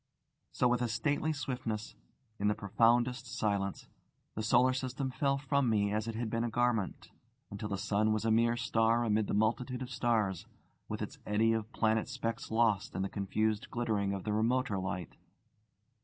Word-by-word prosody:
So 125 - +2
with 120 0 +1
a 120 - +1
stately 145 +7 0
swiftness, 125 -7 -4 0.5
in 105 - +1
the 105 - +2
profoundest 120 +4 +2
silence, 100 -4 -2 0.5
the 110 - -3
solar 125 +3 +4
system 130 +1 -3
fell 140 +1 +1
from 140 -2 +1
me 100 -2 +2
as 110 +1 -1
it 115 - -3
had 115 0 -2
been 115 +1 -1
a 120 - -1
garment, 120 -4 0 0.4
until 100 +1 -5
the 100 - -2
sun 105 +2 +1
was 110 0 0
a 115 - +3
mere 115 +1 +3
star 115 0 +2
amid 110 -2 +1
the - - -1
multitude 125 +4 0
of 125 - -8
stars, 110 -8 0 0.4
with - - -3
its - - -7
eddy 110 +2 +3
of 110 0 -3
planet 110 0 +1
specks 115 +5 -3
lost 110 -3 +1
in 95 - -1
the 95 - -2
confused 105 +2 -1
glittering 110 -5 0
of 100 -2 -3
the 105 - -1
remoter 115 -1 +1
light. 90 -2 -4
115 Hz, 180 wpm, -32 LUFS, 105-120 Hz, 0.5 s, solar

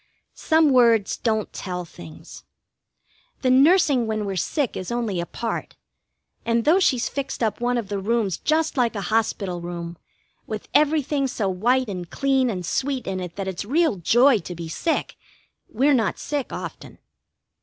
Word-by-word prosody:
Some 315 -2 +3
words 235 -5 +4
don't 220 -2 -1
tell 180 -2 -5
things. 85 - -12 1.0
The 255 - +3
nursing 275 -3 +4
when 215 -1 -2
we're 195 -1 -3
sick 265 - -1
is 185 +4 -5
only 230 -6 -1
a 170 - -3
part, 230 -1 -4 0.7
and 230 0 0
though 335 +5 +5
she's 255 -10 +2
fixed 275 -3 -4
up 220 0 -1
one 245 0 +1
of 230 -4 -3
the 200 0 -3
rooms 210 -2 0
just 315 -1 0
like 240 -3 +1
a 200 - -2
hospital 195 -5 0
room, 170 -1 -6 0.5
with 215 -1 -5
everything 295 -2 +2
so 215 -6 -2
white 245 +7 +1
and 180 -4 -6
clean 270 -2 +1
and 180 -5 -4
sweet 260 - -2
in 190 -1 -3
it 180 -2 -6
that 195 -1 -4
it's 190 0 -4
real 300 - +1
joy 240 - +4
to 175 0 -8
be 170 -1 -6
sick, 320 - -2 0.5
we're 275 +5 +2
not 225 -6 +1
sick 290 -3 -3
often. - - -8
230 Hz, 165 wpm, -23 LUFS, 190-270 Hz, 1.0 s, though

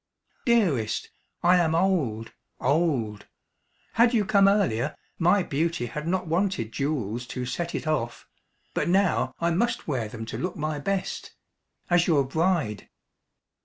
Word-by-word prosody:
"Dearest, 165 - +2 0.3
I 180 +1 +6
am 165 -2 +2
old, 145 - 0 0.3
old. 130 -8 0 0.7
Had 235 +1 +4
you 210 -3 +2
come 200 -1 +5
earlier, 150 - +2 0.2
my 180 +3 +4
beauty 160 -3 -1
had 150 +6 -5
not 185 +1 0
wanted 170 - 0
jewels 120 -5 -2
to 125 -1 -4
set 170 +7 -3
it - - -3
off. 120 -7 -2 0.5
But - - 0
now 190 -1 +2
I 170 0 +1
must 235 +8 0
wear 130 -7 -1
them 115 +1 -7
to - - -5
look 180 0 -3
my 155 -1 -2
best 195 +5 -3 0.5
as 175 -1 +3
your 150 -5 +4
bride." 160 - 0
160 Hz, 140 wpm, -26 LUFS, 125-185 Hz, 0.7 s, I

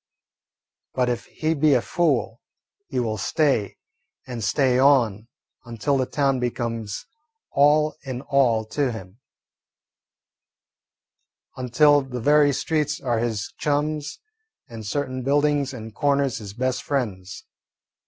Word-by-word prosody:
But 125 -1 +1
if 120 -2 -2
he 160 +1 -1
be 150 -2 +3
a 125 - +3
fool, 140 -9 0 0.5
he 135 -6 -2
will 110 -3 -2
stay 110 - 0 0.5
and 120 -3 -6
stay 125 +4 +2
on 120 -6 +3 0.4
until 120 +2 -1
the 130 -2 0
town 135 -3 +1
becomes 115 -3 -3 0.5
all 150 +2 +3
in 130 -3 -5
all 125 -6 +2
to 140 -1 0
him; 100 -1 -10 2.4
until 145 +4 +4
the 130 -2 -6
very 145 +3 +4
streets 150 +1 -1
are 120 -3 -1
his 110 -4 -3
chums 150 0 -1 0.5
and 110 -3 -8
certain 130 +2 -2
buildings 145 +1 +1
and 110 -4 -9
corners 140 -1 +1
his 100 -2 -8
best 130 +1 -1
friends. 100 -9 -4
130 Hz, 120 wpm, -23 LUFS, 115-145 Hz, 2.4 s, until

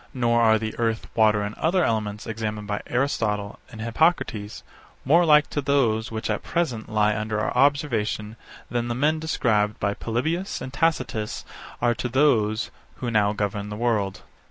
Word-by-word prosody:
Nor 120 -2 +2
are 110 -1 +5
the 110 0 -4
earth, 115 -1 0
water, 110 -2 +3
and 105 +1 -4
other 175 +3 +2
elements, 105 -4 -1
examined 110 -2 -4
by 105 0 -2
Aristotle, 110 -6 -1
and 110 - -10
Hippocrates, 115 -4 0 0.4
more 170 +6 +5
like 150 -1 +6
to 145 - -1
those 125 -5 +1
which 110 -1 -4
at 105 - -1
present 125 -12 -2
lie 105 0 +2
under 105 0 -2
our 110 - -1
observation 120 -6 +1 0.4
than 120 -1 -1
the 120 - -2
men 150 +5 +1
described 110 -9 0
by 100 0 0
Polybius 155 - -2
and 130 - -7
Tacitus 130 -9 -1 0.4
are 120 0 +4
to 125 +2 -4
those 115 -5 +2 0.2
who 120 -2 -4
now 105 -2 +3
govern 105 0 -3
the 105 - -5
world. 105 -4 -1
115 Hz, 165 wpm, -24 LUFS, 105-135 Hz, 0.4 s, like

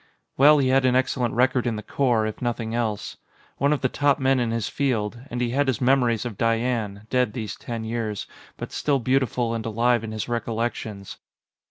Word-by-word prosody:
Well, 150 +3 +7
he 135 -3 +2
had 135 +1 +4
an 130 -1 +3
excellent 125 -2 0
record 125 0 +2
in 115 - 0
the 105 - -6
Corps, 120 -2 +1
if 110 - -5
nothing 115 -2 -2
else. 110 -4 -2 0.4
One 140 +2 +2
of 150 - +1
the 130 - +3
top 140 +1 +2
men 135 -1 +2
in 120 -2 0
his 115 -1 -1
field. 120 -4 -1
And 120 - -4
he 120 -1 0
had 140 +2 +1
his 130 -5 0
memories 125 -3 +2
of 115 -5 -6
Diane, 115 -3 0
dead 125 -4 +2
these 110 -3 -4
ten 115 -2 -6
years, 110 -2 -3 0.3
but - - -6
still 145 -2 +1
beautiful 125 -2 0
and 115 -1 -3
alive 115 +1 +1
in 110 - -5
his 110 -1 -4
recollections. 115 -3 -3
120 Hz, 200 wpm, -24 LUFS, 110-130 Hz, 0.4 s, Well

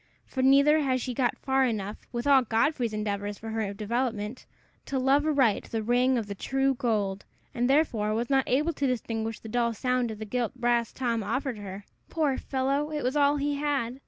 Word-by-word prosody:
For 260 - -3
neither 280 +3 +5
had 260 -3 +1
she 250 0 -3
got 245 0 0
far 265 0 +1
enough, 215 -4 -3
with 240 0 -3
all 280 -2 +6
Godfrey's 235 +1 +1
endeavors 205 -1 -3
for 225 - -8
her 220 -3 -2
development, 220 +2 -3 0.4
to 275 - -2
love 275 +3 +3
aright 265 -9 +2
the 225 -1 -3
ring 250 +3 +2
of 225 - -2
the 205 - -5
true 270 +6 0
gold, 210 -6 -1 0.3
and 245 +1 0
therefore 230 -8 +2
was 235 +2 -1
not 270 -1 +1
able 300 +6 +2
to 280 -1 -1
distinguish 225 -3 -2
the - - -10
dull 235 0 0
sound 250 +1 0
of 220 - -6
the 215 - -6
gilt 245 +2 -2
brass 240 -2 +1
Tom 235 -3 -1
offered 235 +3 -2
her. 200 0 -8 0.2
Poor 300 -5 0
fellow! 275 +3 -1
it 300 -1 -3
was 255 +3 0
all 290 0 +3
he 285 0 -1
had. 275 -4 -1
245 Hz, 200 wpm, -27 LUFS, 220-270 Hz, 0.4 s, all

